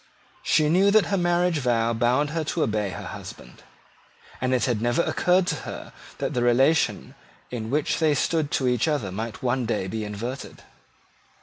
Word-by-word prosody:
She 155 - +2
knew 185 +6 +4
that 215 0 +5
her - - +4
marriage 175 -2 +1
vow 115 -3 +1
bound 125 +6 +1
her 165 0 -1
to 160 +1 0
obey 105 -2 -1
her 90 - -7
husband; - - -10 0.8
and 130 0 0
it 130 -2 +2
had 120 -4 -1
never 120 +8 +1
occurred 180 +1 +2
to - - -1
her - - -8 0.2
that - - -2
the 125 - 0
relation 130 +7 +2 0.4
in 115 -3 -4
which 145 +3 0
they 155 -2 +3
stood 155 +1 0
to 130 - 0
each 125 +3 +1
other 145 -11 -1
might 110 +6 -5
one 125 -1 0
day 105 -4 -1
be 110 +3 -4
inverted. 115 +6 -6
130 Hz, 180 wpm, -25 LUFS, 115-160 Hz, 0.8 s, that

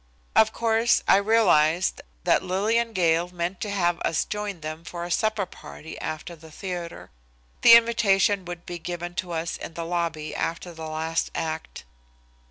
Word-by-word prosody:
Of 220 0 +5
course, 230 +1 +2
I - - +7
realized 190 -6 +3 0.2
that - - +3
Lillian 220 +5 0
Gale 170 -3 +2
meant 180 +1 -4
to 210 - -3
have 175 -4 +1
us 160 - 0
join 210 -4 -4
them 155 +1 -6
for 175 0 -6
a 175 - -5
supper 215 0 +1
party 160 -2 -11
after 155 +2 -5
the 160 0 -15
theatre. 175 0 -6 0.5
The 230 - +9
invitation 215 -4 +4
would 175 -1 -7
be 175 -1 -6
given 175 +1 -5
to 180 - -11
us 165 +1 -3
in 165 - -8
the 170 - -4
lobby 165 -3 -2
after 170 +1 -3
the 160 -1 -7
last 160 +1 -2
act. 160 0 -4
175 Hz, 165 wpm, -25 LUFS, 165-205 Hz, 0.5 s, The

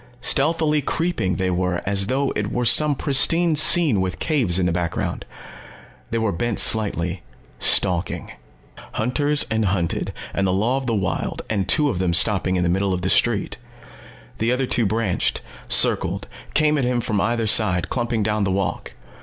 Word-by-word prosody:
Stealthily 150 +4 +1
creeping, 165 - -2
they 95 0 -2
were, 90 0 -2
as 100 0 +1
though 135 +2 -1
it 105 0 -3
were 125 0 -2
some 150 +4 +4
pristine 160 +5 +3
scene 150 - +5
with 95 -1 -3
caves 125 - 0
in 95 - 0
the 90 - 0
background. 85 0 -4 0.8
They 115 - -2
were 110 -2 -1
bent 115 +5 -3
slightly, 95 -5 +2 0.4
stalking. 90 0 +1 0.6
Hunters 145 +6 0
and 110 -1 0
hunted, 90 -3 -2 0.2
and 95 -1 -1
the 90 - 0
law 115 +7 0
of 135 -1 -5
the 115 - 0
wild 95 -4 -3
and 100 -3 -2
two 150 +7 +2
of 90 - -5
them 90 -2 0
stopping 95 0 +2
in 90 - 0
the - - 0
middle 95 +2 0
of 90 - -6
the 95 - -1
street. 115 -1 0 0.8
The 115 +2 0
other 130 +1 -1
two 120 -3 0
branched, 110 -3 -2 0.3
circled, - - +2 0.3
came 150 -1 +2
at - - -1
him 125 0 -1
from 105 -3 -2
either 115 +1 -1
side, 105 -5 +3
clumping 120 -3 -2
down 105 0 -1
the 95 - -1
walk. 95 0 -3
110 Hz, 175 wpm, -21 LUFS, 95-130 Hz, 0.8 s, scene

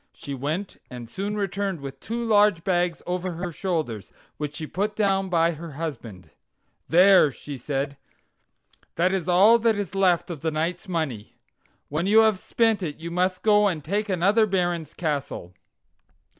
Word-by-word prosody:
She 140 - -8
went 155 +9 -4
and 125 -2 -8
soon 200 - -4
returned 200 -2 -2
with 135 -1 -8
two 235 +7 -4
large 205 -5 +4
bags 175 -3 0
over 180 0 -3
her 175 +1 -4
shoulders, 150 - -3 0.3
which 150 -1 -4
she 155 - -5
put 205 +6 -2
down 195 -2 +1
by 170 -1 +3
her 165 -1 -8
husband. 125 - -7 0.6
"There," 185 -1 +6
she 145 +2 -8
said: 140 +2 -3 1.0
"that 180 +3 +2
is 185 -2 -2
all 205 +6 +6
that 225 -1 +2
is 200 -3 -4
left 185 -3 +2
of 155 -5 -7
the 160 - 0
knight's 165 +4 -3
money. 155 - -3 0.5
When 155 +6 -2
you 220 +2 +6
have 220 -4 +3
spent 225 -1 +1
it 155 -5 -4
you 170 +1 -7
must 185 +1 0
go 210 -1 +5
and 165 -6 -2
take 205 +5 -1
another 200 +5 +3
baron's 175 -5 -1
castle." 140 - -3
175 Hz, 165 wpm, -25 LUFS, 150-200 Hz, 1.0 s, There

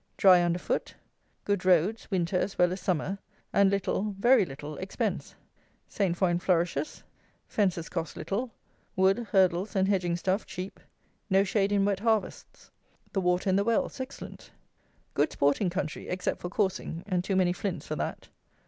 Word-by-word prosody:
Dry 185 -2 +7
under 175 0 +1
foot. - - -3 0.5
Good 200 -3 0
roads, 185 +4 +2
winter 185 -2 0
as 195 +2 0
well 180 0 +3
as 185 - -6
summer, 185 +2 -1 0.3
and 200 -1 +5
little, 200 +1 -1
very 240 0 +5
little, 145 +2 -7
expense. 190 +1 -3 0.5
Saint 185 -4 -1
foin 175 -2 +2
flourishes. 180 - 0 0.4
Fences 185 -5 0
cost 165 -3 -4
little. 235 +6 -2 0.5
Wood, 190 +4 +3
hurdles, 190 +2 +2
and 190 0 +3
hedging 180 -4 +1
stuff 185 +4 -1
cheap. 185 +2 -7 0.5
No 195 0 +4
shade 200 0 +1
in 200 -1 +3
wet 200 -2 +1
harvests. 220 -3 -2 0.4
The 195 - +1
water 180 +1 +1
in 185 - +3
the 200 - +3
wells 230 +4 0
excellent. 260 +1 -8 0.6
Good - - +1
sporting 145 +7 +2
country, 175 -3 -4
except 180 0 -2
for 175 - -4
coursing, 185 -3 -2
and 180 -3 0
too 195 - -1
many 180 -2 +3
flints 180 -5 -4
for 155 - -3
that. - - -4
190 Hz, 160 wpm, -28 LUFS, 175-200 Hz, 0.6 s, Dry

